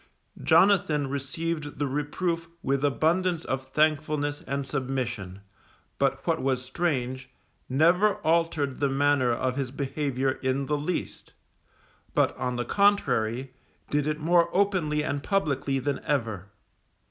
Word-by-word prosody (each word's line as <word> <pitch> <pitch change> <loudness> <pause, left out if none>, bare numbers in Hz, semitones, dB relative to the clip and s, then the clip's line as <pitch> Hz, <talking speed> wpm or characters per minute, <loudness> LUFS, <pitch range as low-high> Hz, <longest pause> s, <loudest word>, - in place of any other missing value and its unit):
Jonathan 160 -4 +4
received 145 +2 -3
the 145 - 0
reproof 165 +5 -2
with 135 +1 0
abundance 165 +4 +1
of 130 0 -3
thankfulness 150 0 0
and 140 +1 -2
submission, 125 -8 -3 0.6
but - - 0
what - - +1
was 130 -1 0
strange, 130 -3 -2 0.4
never 175 +9 +4
altered 160 -4 +1
the 140 - +2
manner 135 -2 +2
of 125 +2 -1
his 135 -2 -1
behaviour 135 -1 -1
in 130 +1 0
the 150 - -2
least; 150 +5 -4 0.8
but - - +2
on 125 -1 -2
the 120 0 -2
contrary, 130 - +1 0.4
did 145 0 +1
it 155 0 -1
more 170 +2 +3
openly 180 -7 +1
and 145 -1 -2
publicly 140 -7 0
than 135 +1 -1
ever. 110 -9 -2
145 Hz, 125 wpm, -27 LUFS, 130-160 Hz, 0.8 s, Jonathan